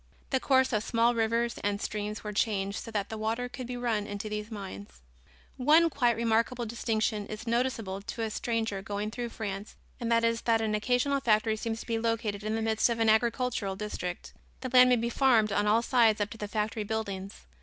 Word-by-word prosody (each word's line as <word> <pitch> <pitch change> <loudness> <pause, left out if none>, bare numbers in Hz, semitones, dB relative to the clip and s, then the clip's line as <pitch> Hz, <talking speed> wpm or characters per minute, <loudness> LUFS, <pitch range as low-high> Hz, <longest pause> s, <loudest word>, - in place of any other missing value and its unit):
The 265 - +2
course 260 -1 +3
of 215 -1 +1
small 230 +1 +2
rivers 230 +1 0
and 205 0 -1
streams 210 +1 -4
were 210 -1 -5
changed 200 -2 0
so - - -8
that 205 -3 -2
the 220 - -5
water 225 +3 -1
could 250 0 -7
be 250 0 -4
run 225 -4 -1
into 205 +1 -5
these 210 0 -4
mines. 105 - -8 0.6
One 315 +6 +5
quite 245 -4 +2
remarkable 230 +1 +1
distinction 220 -2 -1
is 215 +1 -7
noticeable 230 -5 -1
to 225 +3 -5
a 220 - -2
stranger 225 -4 -2
going 205 +2 -3
through 240 +1 -4
France 205 -2 -6 0.2
and 235 -1 -2
that 230 0 +4
is 230 0 +1
that 230 -1 +2
an 220 -1 -1
occasional 250 +6 +1
factory 220 -3 +2
seems 225 0 -4
to - - -10
be 230 -1 -1
located 225 -3 -1
in 215 +1 -1
the 225 - -1
midst 220 +1 +2
of 235 - 0
an 225 -1 +3
agricultural 230 -2 +1
district. 190 -3 -5 0.3
The 255 - -3
land 250 0 +8
may 250 - +6
be 235 0 -1
farmed 235 -6 +3
on 205 +1 +1
all 225 +3 +4
sides 230 -4 +4
up 205 0 -1
to 225 - -8
the 210 - -3
factory 215 +1 -2
buildings. 200 -2 -5
225 Hz, 210 wpm, -29 LUFS, 210-235 Hz, 0.6 s, land